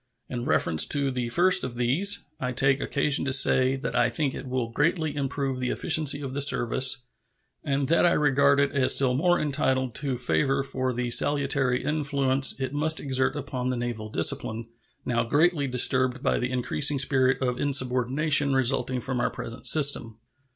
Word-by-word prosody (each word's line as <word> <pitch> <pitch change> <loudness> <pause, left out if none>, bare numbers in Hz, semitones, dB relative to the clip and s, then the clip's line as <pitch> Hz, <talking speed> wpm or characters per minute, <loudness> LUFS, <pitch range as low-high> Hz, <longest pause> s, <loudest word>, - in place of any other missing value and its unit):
In 120 -1 -5
reference 85 - +1
to 140 -2 0
the 125 -2 -4
first 180 +9 +3
of 130 -2 -6
these, 150 +13 +1
I 125 -1 -4
take 135 +1 +1
occasion 140 0 0
to 135 - -2
say 130 0 +4
that 135 - -6
I 120 0 +2
think 135 +3 -3
it - - -8
will 125 -2 -4
greatly 155 +3 -1
improve 135 -2 -4
the 125 -1 -3
efficiency 145 -2 +1
of 135 -2 -7
the 140 - -3
service, 130 -1 +3 0.6
and 140 -3 -2
that 165 - +2
I 175 - +3
regard 140 -1 +2
it 140 0 +1
as 135 -2 +3
still 130 -2 +2
more 175 +7 +1
entitled 130 -4 -1
to 135 -3 -4
favor 135 +2 -1
for 130 -1 -3
the 125 0 -4
salutary 140 -2 +1
influence 140 -3 0
it 130 +1 -4
must 160 +2 -2
exert 130 -2 -1
upon 130 -3 -5
the 125 - -3
naval 120 -3 -5
discipline, 110 +5 -1 0.4
now 120 -1 -1
greatly 145 +4 0
disturbed 130 0 +1
by - - 0
the 125 - -3
increasing 140 +3 0
spirit 135 -1 +1
of 125 -2 -3
insubordination 140 +2 +1
resulting 130 -1 0
from 130 -1 -4
our - - 0
present 115 +2 -7
system. 140 -7 +3
135 Hz, 175 wpm, -25 LUFS, 125-145 Hz, 0.6 s, say